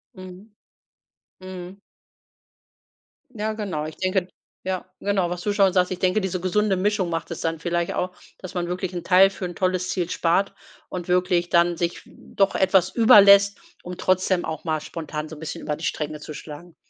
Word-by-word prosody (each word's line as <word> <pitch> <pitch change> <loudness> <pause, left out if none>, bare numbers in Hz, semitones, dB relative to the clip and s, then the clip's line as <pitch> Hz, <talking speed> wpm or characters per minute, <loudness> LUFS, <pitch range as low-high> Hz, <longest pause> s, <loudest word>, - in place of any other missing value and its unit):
Mhm. 185 +3 -12 0.9
Mhm. 185 +1 -9 1.5
Ja 215 0 -2
genau, 190 -8 -4
ich 155 - -8
denke 185 -1 0 0.4
ja, 185 -1 -2 0.2
genau, 195 -3 0
was 175 0 -4
du 205 +2 -1
schon 195 -2 +3
sagst, 180 -1 +2
ich 180 - -4
denke, 185 +3 +2
diese 185 -1 -2
gesunde 200 +2 +1
Mischung 190 -2 0
macht 165 - -3
es 170 - -6
dann 165 -1 -2
vielleicht 170 0 -1
auch, 180 0 -3 0.2
dass 185 -2 -9
man 175 -1 -1
wirklich 180 +1 -3
'n 175 - -4
Teil 185 +2 +6
für 190 -1 -6
'n 175 - -5
tolles 185 0 0
Ziel 180 -3 -2
spart 175 +4 +1 0.3
und 180 -1 -6
wirklich 180 -1 +1
dann 170 0 +3
sich 170 +1 -2
doch 195 -1 -1
etwas 190 -1 +3
über 220 -1 +7
lässt 200 0 +6 0.2
und 180 0 -7
trotzdem 185 -1 +1
auch 160 -2 -5
mal 155 -2 -1
spontan 155 -1 -6
so 160 - -8
'n - - -13
bisschen 160 - -6
über 150 - -2
die 160 - -6
Stränge 150 0 -3
zu 155 - -8
schlagen. 155 +4 -10
180 Hz, 190 wpm, -23 LUFS, 170-190 Hz, 1.5 s, über